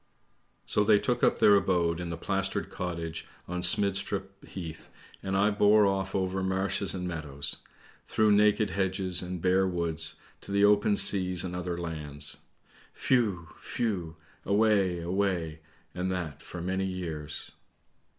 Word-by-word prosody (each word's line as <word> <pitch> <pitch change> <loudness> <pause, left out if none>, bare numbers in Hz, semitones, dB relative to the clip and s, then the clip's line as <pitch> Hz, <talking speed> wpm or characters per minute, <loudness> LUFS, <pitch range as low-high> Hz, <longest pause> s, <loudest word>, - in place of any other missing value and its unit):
" - - -42 0.2
So 105 - +2
they 105 0 +5
took 120 +3 -1
up - - +4
their 105 - +6
abode 90 -4 +2
in 85 -1 -4
the 85 - -4
plastered 95 +2 -2
cottage 85 -3 -5 0.2
on 90 0 -3
Smidstrup 100 +1 0
Heath, 80 -4 -8 0.3
and 95 0 -1
I 105 +2 +3
bore 105 +1 +5
off 95 -1 -1
over 95 0 -1
marshes 95 +1 0
and 90 -1 -3
meadows, 75 -5 0 0.5
through 110 -1 +3
naked 105 +1 +3
hedges 95 -2 0
and 90 0 -5
bare 95 +1 +3
woods, 85 -2 -1 0.3
to - - -9
the 100 +1 +4
open 105 0 +4
seas 90 -3 +2
and 90 -1 -4
other 90 -1 -3
lands. 75 -4 -4 0.7
Whew! 100 -10 +2 0.3
whew! 90 -8 -2 0.3
away, 100 -4 +2
away! 85 -3 -1 0.3
and 90 +1 -2
that 80 -5 -4
for 85 -1 -8
many 95 +1 -1
years." 80 -5 -5
95 Hz, 145 wpm, -29 LUFS, 85-100 Hz, 0.7 s, their